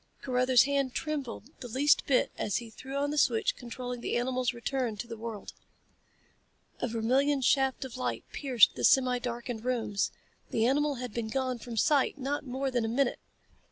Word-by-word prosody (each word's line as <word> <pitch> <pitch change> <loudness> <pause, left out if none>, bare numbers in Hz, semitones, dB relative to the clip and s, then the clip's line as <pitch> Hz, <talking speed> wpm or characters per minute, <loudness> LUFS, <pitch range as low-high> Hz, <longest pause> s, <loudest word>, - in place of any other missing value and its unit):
Carruthers' 255 -1 +4
hand 275 -2 0
trembled 280 -5 -4
the 250 - -7
least 275 +5 +3
bit 260 -3 +3
as 205 - -1
he 230 -2 -7
threw 265 +4 -8
on 285 +1 0
the 300 - +1
switch 450 +7 +2
controlling 245 0 -6
the - - -1
animal's 250 0 0
return 240 -2 -2
to 220 - -5
the 235 -1 -7
world. 225 -2 -7 1.3
A - - -1
vermilion 260 +5 +1
shaft 265 +1 +2
of 255 - -8
light 120 -2 -3
pierced 255 -6 +4
the - - -6
semi 255 -2 +4
darkened 240 -2 -4
rooms. 230 -5 0 0.4
The 225 - +1
animal 290 +3 +2
had 250 -3 -6
been 235 -2 -2
gone 255 +1 -2
from 230 0 -7
sight 285 +5 +3
not 280 +2 -2
more 265 +2 -2
than 245 -2 0
a - - -1
minute. 245 +3 +1
250 Hz, 180 wpm, -30 LUFS, 235-275 Hz, 1.3 s, Carruthers